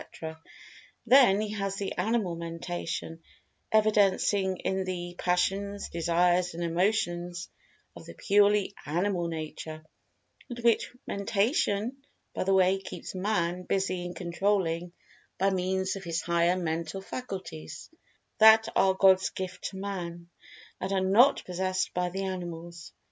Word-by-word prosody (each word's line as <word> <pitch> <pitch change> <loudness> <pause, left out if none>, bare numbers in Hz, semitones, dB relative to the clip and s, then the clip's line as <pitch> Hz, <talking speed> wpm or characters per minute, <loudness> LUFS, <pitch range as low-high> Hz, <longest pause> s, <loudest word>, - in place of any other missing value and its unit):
—then 240 -5 +6
he 215 0 -2
has 195 -2 -2
the 195 -1 -3
animal 200 -2 0
mentation 165 0 -5 0.5
evidencing 205 -3 +3
in 190 +1 -1
the 175 -1 -4
passions, 195 +3 0
desires, 175 +1 +1
and 170 - -3
emotions 175 -1 -1 0.5
of - - -10
the - - -10
purely 205 -1 +3
animal 175 +2 0
nature, 155 -1 -6 0.6
and 245 - -6
which 235 -1 +2
mentation, 205 +3 0 0.4
by - - -2
the 195 - 0
way, 190 0 +4
keeps 190 - -8
Man 180 -2 -1
busy 185 -1 -1
in 175 0 -6
controlling 175 -1 -1 0.5
by 195 +1 +2
means 190 +1 -1
of 195 - -7
his 165 -2 -2
higher 170 +1 +2
mental 165 +1 -3
faculties, 190 - -7 0.5
that 220 +1 +7
are 190 -1 +4
God's 190 -1 +5
gift 185 -1 -6
to 190 - -4
Man, 175 -3 -6 0.5
and 190 - -3
are 195 - +2
not 200 +8 +4
possessed 185 +1 -2
by 180 0 0
the 190 +2 -4
animals. 175 -2 -6
185 Hz, 125 wpm, -28 LUFS, 175-200 Hz, 0.6 s, that